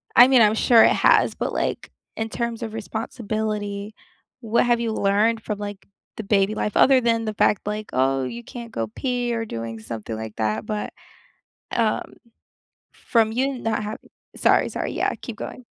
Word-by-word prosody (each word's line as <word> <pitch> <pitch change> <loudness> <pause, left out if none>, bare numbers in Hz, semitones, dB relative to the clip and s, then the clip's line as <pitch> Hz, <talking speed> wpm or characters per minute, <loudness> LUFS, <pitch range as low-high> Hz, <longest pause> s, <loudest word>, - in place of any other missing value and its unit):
I 245 - +9
mean, 260 -2 +5
I'm 210 0 +4
sure 230 0 +6
it - - +6
has, - - +4
but, - - -3
like, - - -2 0.3
in 225 0 -2
terms 235 0 -3
of 220 -1 -5
responsibility, 215 -2 -4 0.5
what 230 0 +2
have 240 -1 +2
you 230 -1 -1
learned 215 +2 +2
from, 210 -1 -4
like, 205 -1 -7 0.3
the 220 - -4
baby 200 0 +2
life 210 - -2
other 265 -1 +6
than 230 -1 +1
the 215 - -2
fact 210 - +2
like, 210 +1 -3
oh, 135 +1 +2
you 120 -1 -6
can't 235 - -9
go 115 - -2
pee 245 -2 -1
or 225 -1 -2
doing 115 - -6
something 110 0 -6
like 110 -1 -7
that, 110 0 -1
but, 210 -1 -3 0.8
um, 225 -2 0 0.8
from 225 -2 +1
you 265 +3 -1
not 225 -2 -1
havi 215 +1 -5 0.4
Sorry, - - +3
sorry, - - -3
yeah, - - 0
keep - - -7
going. 255 - -7
215 Hz, 180 wpm, -23 LUFS, 200-230 Hz, 0.8 s, I